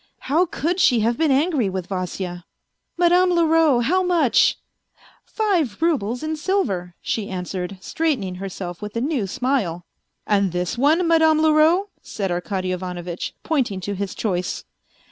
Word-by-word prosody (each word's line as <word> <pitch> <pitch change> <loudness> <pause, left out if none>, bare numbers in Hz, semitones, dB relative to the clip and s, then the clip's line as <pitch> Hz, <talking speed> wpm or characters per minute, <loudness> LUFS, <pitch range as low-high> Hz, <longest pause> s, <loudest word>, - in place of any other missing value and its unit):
How 325 +7 +2
could 350 0 -2
she 245 -9 +4
have 230 +2 +1
been 315 +2 +1
angry 275 - +2
with 185 -2 -4
Vasya? 180 -1 -4 0.3
" - - -54
Madame 355 +1 +4
Leroux, 325 -6 +3
how 355 +10 +2
much? 335 - +3 0.3
" - - -31
" - - -30
Five 355 - 0
roubles 250 -8 0
in 315 0 -2
silver," 200 - -1
she 215 -3 -2
answered, 185 0 -4
straightening 260 - -1
herself 180 -2 -6
with 210 +1 -7
a - - 0
new 265 -7 -1
smile. 190 -7 -1 0.2
" - - -52
And 200 -3 +1
this 180 0 -2
one, 310 +8 +3
Madame 320 -1 +4
Leroux? 320 +6 +4
" - - -43
said 195 -3 -4
Arkady 185 +1 -2
Ivanovitch, 180 -1 -5
pointing 255 -11 0
to 200 +3 -3
his 200 0 -4
choice. 185 -4 -2
240 Hz, 165 wpm, -22 LUFS, -, 0.3 s, she